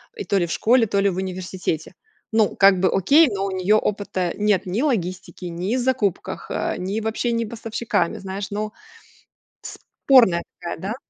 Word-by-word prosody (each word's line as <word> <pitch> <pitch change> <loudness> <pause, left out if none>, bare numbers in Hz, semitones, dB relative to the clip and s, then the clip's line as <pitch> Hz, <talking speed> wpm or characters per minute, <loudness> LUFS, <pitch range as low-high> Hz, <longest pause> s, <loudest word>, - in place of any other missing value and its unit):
и 425 - -5
то 200 - 0
ли 175 - +2
в - - -6
школе, 240 +1 +3
то 200 0 0
ли 200 - +3
в 180 - -4
университете. 185 -3 -4 0.4
Ну 220 -2 +2
как 195 -1 +5
бы 190 - +3
окей, 280 - +5
но 200 -5 -2
у 195 - -3
нее 190 +3 +2
опыта 195 -4 -1
нет, 210 -2 +1
ни 190 +6 -2
логистики, 185 - -2
ни 175 +6 -2
в - - 0
закупках, 240 -7 -1 0.3
ни 195 +4 -3
в 220 - -3
общении 230 +1 -1
поставщиками, 225 -5 -2
знаешь, 195 +1 -5
ну, 210 +1 -3 0.9
спорная 230 -11 +2 0.2
такая, 170 - -5
да. 195 +6 -4
200 Hz, 175 wpm, -22 LUFS, 185-225 Hz, 0.9 s, как